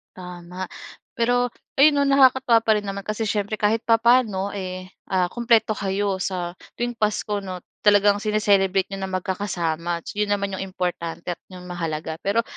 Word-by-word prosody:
Tama. 180 0 -7 0.5
Pero, 245 +1 +2 0.3
ayon 290 +1 +7
no 285 - +3
nakakatawa 265 -3 +5
pa 220 - +3
rin 210 - -1
naman 195 0 -4
kasi 215 +2 -3
siyempre 205 0 -1
kahit 215 +2 +1
papaano, 225 -4 +3
eh, 185 -2 -5 0.2
ah, 185 -2 +1
kumpleto 235 -2 +2
kayo 195 -1 -1
sa 180 -2 -3 0.2
tuwing 240 0 -2
Pasko 210 -1 0
no 185 -1 -6 0.2
talagang 205 0 +4
sine-celebrate 200 -3 +2
n'yo 195 - -4
na 190 - -3
magkakasama, 175 -3 -2
yon 210 0 -1
naman 200 -1 0
ang 190 - -4
importante 175 -3 -4
at - - -16
'yong 180 -1 -10
mahalaga. 160 -3 -4
Pero, 215 +4 +2
200 Hz, 160 wpm, -23 LUFS, 185-215 Hz, 0.5 s, ayon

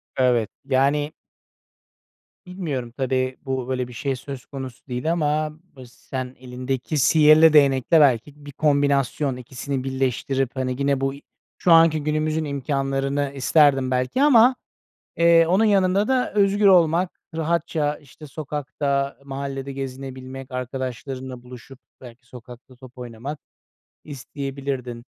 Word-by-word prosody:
Evet. 125 -4 +2 0.2
Yani 140 +2 +1 1.3
Bilmiyorum. 155 -10 -5
Tabii, 130 -1 -1
bu, 130 -2 -3
böyle 130 -1 -2
bir 125 - -12
şey 135 +3 -2
söz 130 0 -9
konusu 135 -2 -9
değil 125 +5 -2
ama 155 -2 0 0.2
bıs 125 -3 -13
sen 130 -1 -6
elindeki 130 +3 -4
sihirli 155 +2 +6
değnekle 140 +1 +4
belki 145 +2 +1
bir 145 - -8
kombinasyon, 140 -1 +1
2'si 130 +2 -5
birleştirip, 135 0 -1
hani, 130 -1 -2
gene 140 0 0
buy 135 +1 -2 0.4
şu 175 - +1
anki 165 -2 +5
günümüzün 155 +1 -1
imkânlarını 135 0 -2
isterdim 135 -1 +3
belki 130 - 0
ama, 255 -3 +6 0.6
eee, 170 0 +5
onun 190 +6 +3
yanında 200 0 +2
da 260 -1 +1
özgür 200 0 +3
olmak, 175 -1 +3 0.2
rahatça 160 -2 -1
işte 150 +1 -15
sokakta, 140 -1 -3
mahallede 135 0 -5
gezinebilmek, 130 0 -7
arkadaşlarınla 130 0 -5
buluşup 125 +1 -13 0.2
belki 125 -1 -14
sokakta 125 +1 -13
top 130 0 -15
oynamak 125 +4 -7 0.6
isteyebilirdim. 135 -3 -6
135 Hz, 120 wpm, -23 LUFS, 130-155 Hz, 1.3 s, sihirli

